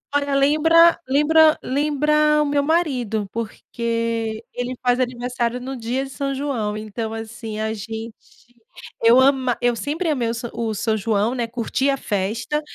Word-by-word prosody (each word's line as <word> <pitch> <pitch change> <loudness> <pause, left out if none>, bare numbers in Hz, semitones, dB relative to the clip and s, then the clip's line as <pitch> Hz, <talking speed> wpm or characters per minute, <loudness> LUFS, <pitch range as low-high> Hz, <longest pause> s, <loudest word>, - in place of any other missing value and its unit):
Olha, 285 -1 +1
lembra 325 +4 +5
lembra 310 +3 +4
lembra 300 +2 +2
o 300 - +1
meu 285 0 +1
marido, 255 - 0
porque 230 0 -3
ele 245 +1 -3
faz 245 0 +2
aniversário 245 -1 -2
no 265 +2 -6
dia 245 +3 -2
de 270 - -10
São 275 +1 -3
João. 250 -7 -2
Então 220 +1 -5
assim, 225 -1 -6
a 220 0 -1
gente 225 +1 -6 0.9
eu 235 +2 +7
ama 260 -2 +3
eu 245 -1 +2
sempre 310 +8 -2
amei 245 -6 0
o - - -1
sa 235 0 -5
o 230 -2 -2
São 220 +1 0
João, 215 +3 0
né, 240 -2 -1
curti 245 +4 -1
a 275 - +1
festa, 215 +8 -2
245 Hz, 160 wpm, -21 LUFS, 225-285 Hz, 0.9 s, eu